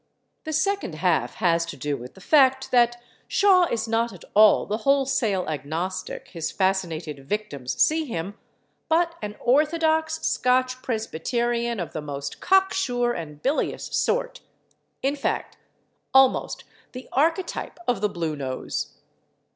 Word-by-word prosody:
The 315 - -3
second 390 - 0
half 155 -7 0
has 170 -2 +2
to 155 - -7
do 145 +2 -2
with 125 -1 -10
the 190 - -15
fact 265 +1 +4
that 240 -1 +3 0.3
Shaw 370 -3 +4
is 230 -1 -2
not 230 +1 +1
at 185 -5 -13
all 215 0 +6
the 210 - -2
wholesale 255 -6 +1
agnostic 160 +5 -4
his 165 -3 -4
fascinated 170 -7 -1
victims 145 -12 -3
see 315 +1 +3
him, 195 - -5 0.5
but 335 +1 +2
an 210 0 -5
orthodox 315 +3 +2
Scotch 255 0 +1
Presbyterian 235 +1 -1
of 170 -3 -5
the 155 - -4
most 140 -1 -6
cocksure 375 -11 +2
and 150 -5 -8
bilious 285 +3 0
sort—in - - -3
fact, 285 - -3 0.6
almost 265 -1 +4 0.3
the 255 0 -8
archetype 330 +6 0
of 245 -5 +1
the 210 - +2
blue 165 -4 -3
nose. 130 -2 -4
235 Hz, 130 wpm, -24 LUFS, 170-280 Hz, 0.6 s, all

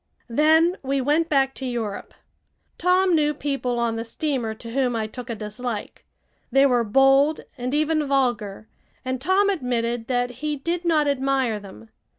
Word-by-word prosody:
Then 320 +7 +4
we 275 0 -1
went 300 +5 +1
back 270 -2 +2
to - - -9
Europe. 225 -5 -4 0.6
Tom 365 +1 +3
knew 300 -2 +2
people 275 -4 -2
on 235 -1 0
the 225 - -3
steamer 240 -2 -3
to 230 +1 -9
whom 250 -1 0
I 220 -1 -1
took 245 +3 -9
a 230 - -2
dislike. 215 +1 -6 0.4
They 270 +2 +5
were 245 -3 +3
bold 270 +6 +4
and 250 -1 -4
even 310 0 +1
vulgar, 235 -7 -1 0.4
and 255 0 -3
Tom 380 +6 +3
admitted 240 -7 -2
that 245 -1 0
he 305 -1 -1
did 340 +5 -3
not 310 -3 +3
admire 265 -5 0
them. 115 - -13
265 Hz, 160 wpm, -23 LUFS, 235-300 Hz, 0.6 s, They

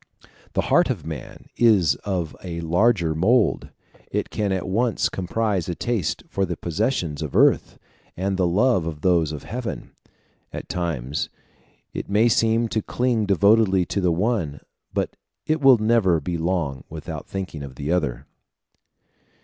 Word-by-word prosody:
The - - +2
heart - - +5
of - - -3
man 80 -6 -8
is 105 -9 +5
of 90 -6 -3
a 85 -2 -5
larger 85 0 +2
mould: 105 +9 +2 0.4
it - - -2
can 105 -2 -1
at 95 -2 -2
once 115 +5 +1
comprise 95 -1 -1
a 85 - -2
taste 115 -7 -2
for 100 - -1
the 90 -3 -2
possessions 85 - -1
of 75 -4 -5
earth - - +3 0.4
and 95 +2 -1
the 95 -2 +2
love 95 -1 +2
of 75 -2 -5
those 85 -4 +2
of 75 - -6
heaven: 120 +1 -5 0.6
at - - -7
times 75 -6 -2 0.6
it - - -5
may 110 +4 +4
seem 115 +1 +2
to 110 - 0
cling 120 -2 0
devotedly 100 -1 +4
to 100 - -2
the 90 -2 +2
one, 85 -5 -1 0.3
but - - -2 0.3
it 155 0 0
will 135 -3 +7
never 110 -6 +3
be 85 +4 -3
long 80 -5 -1
without - - -7
thinking 95 -6 -5
of 70 -2 -8
the 75 +3 -3
other. 80 -8 -1
95 Hz, 155 wpm, -23 LUFS, 80-110 Hz, 0.6 s, will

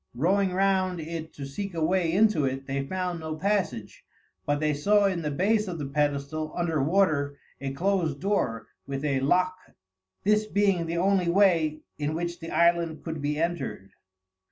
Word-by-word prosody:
Rowing 190 +8 +2
round 185 -1 +1
it 160 0 -5
to 140 - -6
seek 185 +7 -5
a 160 -1 +1
way 175 -1 +1
into 205 -3 +3
it 135 0 -2
they 135 0 -2
found 180 -1 -2
no 160 -1 -4
passage, 175 - -2 0.4
but 145 0 +1
they 150 0 +1
saw 200 +8 +3
in 185 -3 0
the 150 - -2
base 210 +8 +1
of 175 -2 -4
the 145 - -4
pedestal, 145 +2 -1
under 165 -4 0
water, 145 -3 +2 0.2
a 135 0 -3
closed 165 -1 0
door 170 - -1 0.2
with 140 +1 -3
a 140 -2 +1
lock 180 +7 +2 0.7
this 210 +1 +2
being 195 -5 +1
the 170 +1 -2
only 185 -1 +2
way 170 -5 +3 0.2
in 150 +1 -1
which 170 +1 -3
the 165 -1 -7
island 170 -2 +2
could 160 -3 -5
be 145 +1 -1
entered. 135 - -3
165 Hz, 175 wpm, -27 LUFS, 145-185 Hz, 0.7 s, into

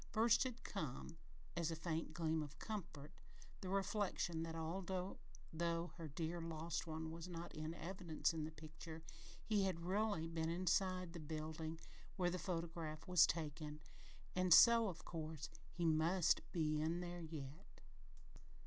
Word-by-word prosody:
First 235 +3 +5
had 250 -2 -4
come, 155 -4 -4 0.4
as 170 -2 +1
a 165 - -1
faint 165 0 -2
gleam 160 -2 +1
of 145 -1 -6
comfort, 165 -9 -5 0.5
the 185 - -5
reflection 195 -4 +1
that 165 0 -3
although 180 +3 -2 0.7
her 165 -2 -6
dear 165 +3 -2
lost 165 +1 -2
one 160 0 -3
was 165 +1 -6
not 170 -1 -6
in 155 +1 -4
evidence 170 -2 -1
in 160 -1 -2
the 155 - -2
picture, 160 +1 -9 0.4
he 205 -3 +3
had 170 -3 -1
really 200 -3 +1
been 165 -1 -1
inside 185 0 +1
the 170 - -5
building 155 +1 -4 0.4
when 180 -3 +2
the 180 - -1
photograph 165 -3 -3
was 180 -2 +7
taken, 150 -1 -3 0.6
and 185 -2 +7
so, 230 -1 +9
of 175 -4 -5
course, 155 -2 -4 0.2
he 175 0 -1
must 165 +2 +4
be 155 -3 +1
in 165 +3 +1
there 175 0 -4
yet! 155 +1 -8
165 Hz, 150 wpm, -42 LUFS, 160-185 Hz, 0.7 s, so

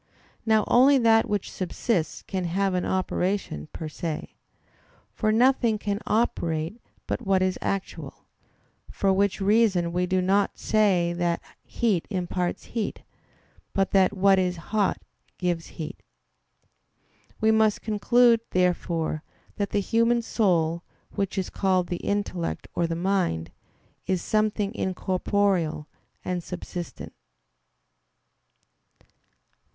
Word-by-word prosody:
Now 220 -1 +4
only 270 +3 +6
that 225 -2 +4
which 205 -2 -2
subsists 180 -1 -2
can 190 -2 -3
have 190 +3 0
an 180 - 0
operation 185 - -1
per 160 - -6
se. 155 0 -5 0.8
For 215 -1 +1
nothing 235 -1 +3
can 205 -1 -2
operate 170 -3 0 0.2
but - - -3
what 195 -4 +2
is 185 -1 0
actual: 195 -1 -4 0.6
for 195 -1 +1
which 200 +1 +1
reason 195 -4 +2
we 180 +1 0
do 185 +1 +1
not 195 +2 +1
say 190 -6 +2
that 175 -1 0 0.2
heat 210 -8 -1
imparts 180 -2 -2
heat, 225 -3 -3 0.7
but 195 -1 +1
that 195 +1 +3
what 195 0 +5
is 180 -1 0 0.2
hot 210 -3 +2 0.4
gives 175 -2 -1
heat. 155 -1 -6 1.4
We 220 -1 +4
must 220 -1 +2
conclude, 230 +2 +4
therefore, 170 -3 0 0.4
that 200 -1 -1
the 205 - 0
human 230 +3 +2
soul, 170 -7 +1 0.3
which 195 -1 -2
is 190 - -2
called 185 -3 +1
the 175 - -2
intellect 200 -4 -2
or 170 - 0
the 165 - -2
mind, 175 - 0 0.6
is 185 -2 0
something 215 -1 0
incorporeal 185 -5 0 0.4
and 180 -1 -2
subsistent. 175 0 -7
190 Hz, 115 wpm, -26 LUFS, 175-215 Hz, 1.4 s, only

